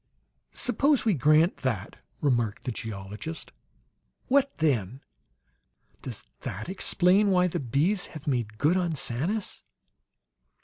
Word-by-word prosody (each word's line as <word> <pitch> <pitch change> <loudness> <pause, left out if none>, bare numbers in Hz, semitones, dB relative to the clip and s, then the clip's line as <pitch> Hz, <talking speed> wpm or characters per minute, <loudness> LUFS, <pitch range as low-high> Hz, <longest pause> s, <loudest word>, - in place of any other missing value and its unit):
"Suppose 260 +1 +2
we 220 - +4
grant 155 +4 +4
that," 115 -6 -3 0.2
remarked 120 -7 0
the 125 - -2
geologist. 110 +7 -6 0.8
"What 280 +1 +2
then? 130 - 0 1.0
Does - - -7
that - - -6
explain 190 +2 +4
why 180 -1 +4
the 175 - -2
bees 150 - 0
have 150 - -13
made 120 -6 -1
good 155 +9 +3
on 175 -3 0
Sanus?" 160 - -2
155 Hz, 115 wpm, -27 LUFS, 120-190 Hz, 1.0 s, we